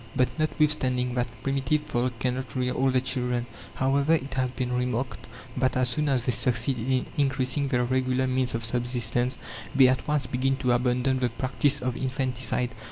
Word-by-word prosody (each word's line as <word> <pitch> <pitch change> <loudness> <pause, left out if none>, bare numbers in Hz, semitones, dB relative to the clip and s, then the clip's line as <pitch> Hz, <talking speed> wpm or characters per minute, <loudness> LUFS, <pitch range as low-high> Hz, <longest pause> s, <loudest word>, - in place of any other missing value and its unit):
But 125 - +3
notwithstanding 135 -5 +1
that, 125 0 0 0.2
primitive 135 +2 0
folk 120 -3 -2
cannot 130 +2 -3
rear 125 -1 0
all 135 +1 +2
their 130 -1 +2
children. 125 -2 -1 0.3
However, 140 +3 +2
it 140 -4 -1
has 130 -1 0
been 125 0 -3
remarked 125 +1 -2 0.3
that 130 0 +1
as 130 -1 +2
soon 150 +4 0
as 130 -3 +1
they 125 - +1
succeed 120 +2 +2
in 130 +2 0
increasing 135 0 +1
their 125 -3 +1
regular 130 +1 +1
means 130 -1 0
of 115 -1 -3
subsistence, 120 +1 0 0.4
they 135 -1 +7
at 130 0 0
once 150 -3 +1
begin 130 +1 0
to 125 -2 0
abandon 125 +2 +1
the 125 -1 +1
practice 130 +4 0
of 125 -1 -1
infanticide. 130 -2 -1
130 Hz, 175 wpm, -26 LUFS, 125-135 Hz, 0.4 s, they